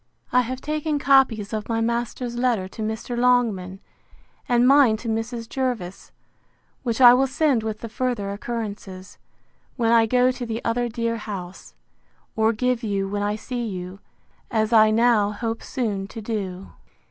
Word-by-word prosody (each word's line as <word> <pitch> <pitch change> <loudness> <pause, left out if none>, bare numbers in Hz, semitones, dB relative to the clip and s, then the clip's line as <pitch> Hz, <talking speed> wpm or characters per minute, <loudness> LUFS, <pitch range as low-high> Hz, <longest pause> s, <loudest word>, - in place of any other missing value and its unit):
I 250 - +4
have 255 +2 -5
taken 305 0 -2
copies 260 -7 +3
of 215 0 -4
my 225 0 0
master's 235 +1 -2
letter 240 -6 0
to 205 - -9
Mr. 220 +3 -3
Longman, 230 -7 +1 0.7
and 245 0 +4
mine 270 -5 +5
to 230 - -8
Mrs. 225 +1 -3
Jervis, 240 -9 -4 0.7
which 235 -2 -2
I 245 -2 +9
will 265 +2 +3
send 275 -2 +1
with 220 -1 -5
the 230 - -5
further 225 -3 -2
occurrences, 200 -3 -6 0.6
when 230 -2 +1
I 230 -1 +5
go 250 +2 +3
to 250 0 -6
the 230 0 -5
other 240 +1 0
dear 230 0 -2
house, 195 -4 -8 0.6
or 220 0 +3
give 250 +1 0
you 200 -4 -1
when 205 +1 -3
I 205 +1 0
see 240 +3 -5
you, 185 -3 -6 0.5
as 220 -1 0
I 215 -1 +7
now 220 -2 +3
hope 225 +1 -4
soon 205 -6 -3
to 225 - -9
do. 195 -4 -5
230 Hz, 160 wpm, -23 LUFS, 210-245 Hz, 0.7 s, I